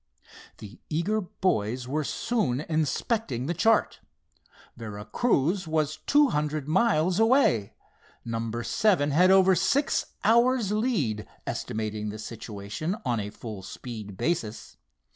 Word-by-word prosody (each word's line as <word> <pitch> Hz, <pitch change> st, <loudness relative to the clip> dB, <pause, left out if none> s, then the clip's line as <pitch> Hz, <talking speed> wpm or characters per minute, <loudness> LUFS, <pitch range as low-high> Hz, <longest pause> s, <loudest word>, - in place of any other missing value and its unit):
The 105 Hz, +1 st, -11 dB
eager 190 Hz, +8 st, 0 dB
boys 125 Hz, -, -1 dB
were 150 Hz, +4 st, -1 dB
soon 145 Hz, -, -1 dB
inspecting 155 Hz, -, -1 dB
the 170 Hz, -, -1 dB
chart. 220 Hz, +5 st, +2 dB, 0.8 s
Vera 105 Hz, -3 st, -7 dB
Cruz 180 Hz, -, +1 dB
was 155 Hz, -1 st, 0 dB
two 290 Hz, -1 st, +5 dB
hundred 150 Hz, -, -2 dB
miles 185 Hz, 0 st, +2 dB
away. 225 Hz, -, +3 dB, 0.5 s
Number 115 Hz, 0 st, -3 dB
seven 185 Hz, -, +2 dB
had 180 Hz, +6 st, +5 dB
over 190 Hz, 0 st, +6 dB
six 270 Hz, -, +1 dB, 0.2 s
hours' 235 Hz, -1 st, +3 dB
lead, 195 Hz, -, 0 dB, 0.2 s
estimating 105 Hz, -1 st, -3 dB
the 105 Hz, -, -6 dB
situation 110 Hz, -, -5 dB
on 120 Hz, -2 st, 0 dB
a 105 Hz, 0 st, -4 dB
full 110 Hz, -1 st, -8 dB
speed 105 Hz, -1 st, -8 dB
basis. 115 Hz, -, -2 dB
155 Hz, 120 wpm, -27 LUFS, -, 0.8 s, over